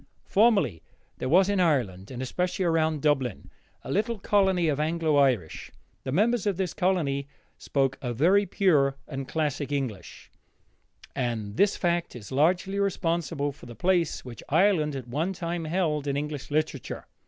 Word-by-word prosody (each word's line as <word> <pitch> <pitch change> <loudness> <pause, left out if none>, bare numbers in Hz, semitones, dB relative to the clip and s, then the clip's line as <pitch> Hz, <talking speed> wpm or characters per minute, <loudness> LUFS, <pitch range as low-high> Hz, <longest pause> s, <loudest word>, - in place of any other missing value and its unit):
Formerly 200 - +3 0.4
there 130 - -2
was 185 +5 +5
in 200 -1 +1
Ireland, 120 - +1
and 130 0 -5
especially 180 +7 -1
around 160 -3 +1
Dublin, 135 -7 0 0.3
a - - -6
little 220 +4 0
colony 190 -4 +2
of 145 -2 0
Anglo 160 -1 +1
Irish. 125 - +1 0.4
The 130 - -2
members 215 - +2
of 195 -4 0
this 190 -3 -2
colony 145 -7 0 0.3
spoke 135 -1 0
a 125 - -3
very 185 - +3
pure 150 -8 +2
and 135 -2 -5
classic 145 -2 -2
English, 125 -10 -5 0.8
and 115 -5 -2
this 200 - +3
fact 170 -4 -1
is 110 -2 -10
largely 175 +8 +1
responsible 165 -6 -1
for 125 - -14
the 120 - -10
place 175 -2 0
which 120 -3 -9
Ireland 160 -3 +3
at 130 -3 -6
one 155 +10 -1
time 170 -2 -4
held 155 -4 -1
in 140 0 0
English 150 -1 -4
literature. 150 -3 -2
155 Hz, 155 wpm, -27 LUFS, 135-180 Hz, 0.8 s, was